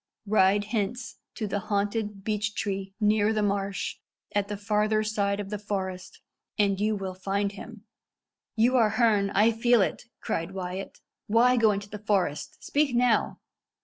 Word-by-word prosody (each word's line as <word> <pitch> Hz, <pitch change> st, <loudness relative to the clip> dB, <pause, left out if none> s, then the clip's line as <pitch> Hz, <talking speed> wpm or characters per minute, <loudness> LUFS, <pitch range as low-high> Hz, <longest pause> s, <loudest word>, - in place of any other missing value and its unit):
"Ride 205 Hz, -1 st, +3 dB
hence 225 Hz, +2 st, -3 dB, 0.2 s
to 220 Hz, -, -3 dB
the 205 Hz, 0 st, -2 dB
haunted 205 Hz, 0 st, -2 dB
beechtree 205 Hz, -2 st, -2 dB
near 210 Hz, 0 st, +3 dB
the 215 Hz, -1 st, 0 dB
marsh, 200 Hz, -1 st, -2 dB, 0.4 s
at 205 Hz, -1 st, +1 dB
the 205 Hz, 0 st, -4 dB
farther 210 Hz, +1 st, +1 dB
side 205 Hz, -2 st, 0 dB
of 200 Hz, -1 st, -5 dB
the 210 Hz, -, -3 dB
forest, 190 Hz, -3 st, -5 dB, 0.4 s
and 200 Hz, -2 st, +2 dB
you 215 Hz, +1 st, +1 dB
will 190 Hz, -2 st, -4 dB
find 200 Hz, +2 st, -1 dB
him." 215 Hz, +2 st, -11 dB, 0.7 s
"You 240 Hz, +3 st, +3 dB
are 225 Hz, -3 st, +4 dB
Herne 210 Hz, -3 st, +2 dB
I 210 Hz, +3 st, +4 dB
feel 230 Hz, -1 st, +3 dB
it," -, -, -3 dB
cried 165 Hz, +3 st, -3 dB
Wyat. 185 Hz, +1 st, -6 dB, 0.3 s
"Why 240 Hz, +4 st, +4 dB
go 225 Hz, -3 st, +4 dB
into 200 Hz, 0 st, -3 dB
the 210 Hz, +1 st, -8 dB
forest? 195 Hz, -8 st, -1 dB
Speak 285 Hz, -3 st, +1 dB
now." 240 Hz, -2 st, +2 dB
205 Hz, 155 wpm, -27 LUFS, 195-220 Hz, 0.7 s, are